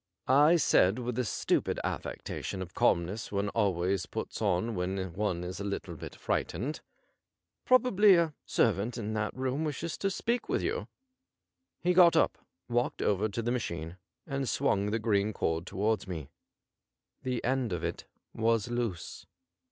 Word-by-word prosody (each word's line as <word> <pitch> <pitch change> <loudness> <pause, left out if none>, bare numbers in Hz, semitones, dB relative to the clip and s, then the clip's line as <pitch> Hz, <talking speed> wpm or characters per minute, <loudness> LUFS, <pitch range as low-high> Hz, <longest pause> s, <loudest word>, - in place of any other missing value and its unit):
I 145 +6 +6
said 105 - +4
with 125 0 -3
the 125 +2 0
stupid 110 - 0
affectation 95 -1 -4
of 90 - -12
calmness 90 +6 +1
one 100 0 0
always 95 -3 0
puts - - -5
on 105 +2 +1
when 95 -1 -2
one 95 -3 -1
is 90 +1 -5
a - - -3
little 100 -1 -4
bit - - -8
frightened: 145 +6 -2 0.4
' - - -59
Probably 215 -6 +6
a 165 -3 +2
servant 115 +2 +1
in 110 -1 -3
that 105 -1 -1
room 130 +3 -1
wishes 155 +2 -3
to 195 - +1
speak 235 +5 -1
to - - +1
you.' - - -2 1.0
He 180 +1 +3
got 175 -2 +7
up^ - - +4 0.4
walked 120 +1 0
over 105 +2 +1
to 115 +3 -3
the 120 - 0
machine, 85 -8 -3 0.3
and 135 -4 -2
swung 100 0 +1
the 110 - 0
green 110 -2 +1
cord 80 -1 -1
towards 105 +1 0
me. 80 -7 -6 0.9
The 125 -2 -2
end 130 -2 0
of 85 - -3
it - - -3 0.3
was 115 0 +1
loose. 115 -9 -3
110 Hz, 160 wpm, -30 LUFS, 95-130 Hz, 1.0 s, got